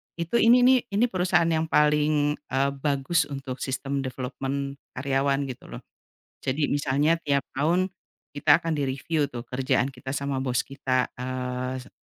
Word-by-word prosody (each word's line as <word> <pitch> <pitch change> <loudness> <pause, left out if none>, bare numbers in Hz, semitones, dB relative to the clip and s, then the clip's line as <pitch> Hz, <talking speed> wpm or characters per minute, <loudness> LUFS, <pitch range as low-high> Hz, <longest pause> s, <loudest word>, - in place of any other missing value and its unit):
itu 170 +7 -1
ini, 240 +2 +6
nih, 260 0 +6
ini 225 +4 +4
perusahaan 175 -3 +2
yang 160 0 +1
paling, 150 -1 +2
eee, 140 -1 -1
bagus 145 +2 +1
untuk 135 -2 -5
sistem 135 +1 -2
development 135 +2 -4 0.2
karyawan, 140 +1 +1
gitu, 125 - -8
loh. - - -8 0.6
Jadi 145 +3 0
misalnya 145 +3 +2
tiap 140 -1 +2 0.2
tahun 175 +6 +2 0.5
kita 150 +4 +4
akan 165 -2 -1
direviu 140 +3 0
tuh 120 - -5
kerjaan 130 0 +1
kita 130 +1 -7
sama 140 -1 -2
bos 125 -2 +1
kita, 130 -2 -1
eee, 125 0 -3
se 125 - -15
140 Hz, 150 wpm, -26 LUFS, 130-155 Hz, 0.6 s, ini